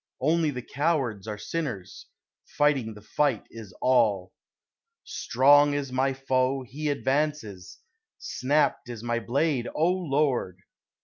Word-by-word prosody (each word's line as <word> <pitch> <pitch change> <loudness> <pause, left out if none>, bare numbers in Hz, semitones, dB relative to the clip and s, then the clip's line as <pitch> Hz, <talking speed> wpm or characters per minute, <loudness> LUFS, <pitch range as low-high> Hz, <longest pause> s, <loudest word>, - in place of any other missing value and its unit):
Only 160 +3 +2
the 125 -4 -5
cowards 135 - -1
are 105 -1 -4
sinners, 105 - -5 0.4
Fighting 135 -7 0
the 105 - -13
fight 135 0 0
is 110 -4 -10
all. 110 -8 +2 0.7
Strong 145 +3 +4
is 140 -2 -3
my 130 +1 +1
foe 130 0 0
he 145 +4 -4
advances! 140 -9 -2 0.4
Snapt 140 0 0
is 115 -2 -7
my 120 0 -1
blade, 130 +1 0
O 155 - +2
Lord! 145 - 0
130 Hz, 120 wpm, -26 LUFS, 115-145 Hz, 0.7 s, Strong